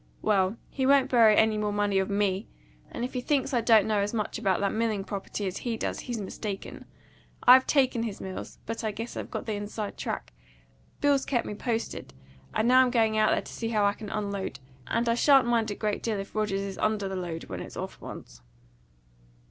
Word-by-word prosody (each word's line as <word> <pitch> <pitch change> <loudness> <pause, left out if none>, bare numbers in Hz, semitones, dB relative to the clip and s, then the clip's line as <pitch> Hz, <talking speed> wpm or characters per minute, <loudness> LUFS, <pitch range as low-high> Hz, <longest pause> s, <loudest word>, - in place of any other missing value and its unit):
Well, 200 0 +2
he 265 -2 0
won't 275 -1 +4
borrow 225 -4 +6
any 220 -1 +3
more 210 -1 0
money 205 -1 +1
of 190 - -1
ME; 200 0 0 0.4
and 235 - -3
if 255 - -7
he 250 - -2
thinks 275 0 0
I 240 - +3
don't 225 -3 +5
know 215 -1 +1
as 205 +3 -1
much 215 0 -2
about 195 -5 +1
that 200 - +1
milling 220 -3 0
property 200 +1 -5
as 185 -1 -3
he 235 -2 -3
does - - -3
he's 240 -3 -4
mistaken. 200 0 -6 0.6
I've 255 +1 +8
taken 260 -4 +2
his 220 -4 -4
mills, 190 -1 -7
but 225 +1 -4
I 220 - 0
guess 225 +3 -6
I've - - -5
got - - -5
the 220 - -2
inside 205 0 -5
track; - - -4 0.7
Bill's 285 -2 +3
kept 245 -4 0
me - - -4
posted; 225 - -4 0.4
and 220 - +1
now 255 +1 +7
I'm 255 - +3
going 225 -3 +2
out 215 - +4
there - - +1
to - - -10
see 225 - -3
how 210 -3 +2
I 200 - +3
can 210 0 -8
unload; 200 -2 -3 0.3
and 235 +1 0
I 230 - +4
shan't 270 +2 +5
mind 230 -2 +1
a 205 - -3
great 210 -1 -2
deal 220 -3 -1
if 195 0 -6
Rogers 210 -2 0
is 195 -1 -5
under 215 -2 0
the 190 - -4
load 170 -3 -4
when - - -6
it's - - -8
off - - -6
once." - - -10
215 Hz, 220 wpm, -28 LUFS, 200-235 Hz, 0.7 s, I've